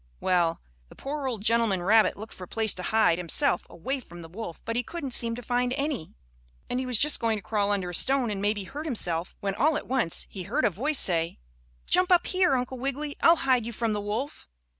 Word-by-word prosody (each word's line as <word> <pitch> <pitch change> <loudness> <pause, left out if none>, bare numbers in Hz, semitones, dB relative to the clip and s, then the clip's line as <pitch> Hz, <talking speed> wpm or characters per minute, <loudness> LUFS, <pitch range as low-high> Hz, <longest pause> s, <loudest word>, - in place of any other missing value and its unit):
Well, 175 -3 +1 0.3
the - - -15
poor 280 0 -4
old 225 -6 -3
gentleman 225 -5 +2
rabbit 215 +3 +4
looked 215 +2 -9
for 185 - -8
a - - -23
place 220 +1 +1
to 185 - -7
hide 180 -3 +2
himself 180 - +1
away 265 +11 -4
from 175 -8 -12
the - - -9
wolf 175 0 -7
but 230 - -3
he 245 - +1
couldn't 280 +1 -6
seem 230 -1 +1
to 245 - -8
find 245 +1 0
any, 275 - -3 0.5
and 250 - -2
he 260 - -3
was 250 -3 +2
just 300 +7 +3
going 225 -1 +1
to - - -7
crawl 205 -1 0
under 190 -3 -1
a - - -10
stone 260 +3 +3
and 195 -1 -3
maybe 205 0 0
hurt 290 +11 -7
himself, 175 - 0
when 200 -1 -1
all 295 +9 +2
at - - -6
once 250 -11 -1
he 195 - -8
heard 175 - 0
a - - +3
voice 285 - -1
say: 165 -5 +2 0.5
"Jump 365 +1 +3
up 350 -1 +5
here, 365 -7 +2
Uncle 250 0 -3
Wiggily. 280 +3 -3
I'll 335 - +7
hide 255 -3 +3
you 235 +1 -6
from 225 -1 -1
the 205 - -2
wolf." 215 - -4
230 Hz, 235 wpm, -27 LUFS, 195-270 Hz, 0.5 s, I'll